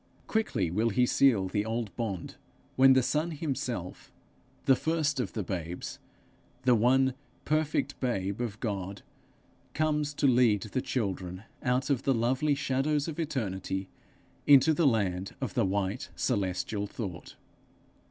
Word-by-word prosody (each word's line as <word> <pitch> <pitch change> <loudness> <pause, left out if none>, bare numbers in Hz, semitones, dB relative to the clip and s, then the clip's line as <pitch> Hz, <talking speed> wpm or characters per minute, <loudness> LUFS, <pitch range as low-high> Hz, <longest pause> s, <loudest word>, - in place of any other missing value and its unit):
Quickly 115 - 0
will 110 +6 +1
he 125 +4 +3
seal 120 -7 +3
the 105 +2 -1
old 110 -1 -3
bond 100 -7 -4 0.4
when 135 0 +7
the 130 -1 +4
Son 155 +6 0
himself, 130 - -4 0.5
the 135 - +6
first 155 -1 0
of 125 - -2
the 105 - -2
babes, 90 -2 -5 0.6
the 125 -1 +5
one 130 +3 +3 0.3
perfect 155 0 0
babe 100 -4 -1
of 110 -3 -4
God, 100 -3 -4 0.7
comes 150 -1 0
to 145 - 0
lead 120 -6 +4
the 115 +4 -2
children 95 -6 -3 0.2
out 125 +3 0
of 135 -3 +1
the 135 -1 +2
lovely 130 +6 +1
'shadows 140 +2 0
of 160 0 -5
eternity' 95 - -3 0.6
into 145 +2 +7
the 155 0 +3
land 95 -6 0
of - - -3
the - - +2
'white 100 +4 -2
celestial 100 -1 -1
thought.' 95 -5 -7
120 Hz, 140 wpm, -29 LUFS, 100-140 Hz, 0.7 s, when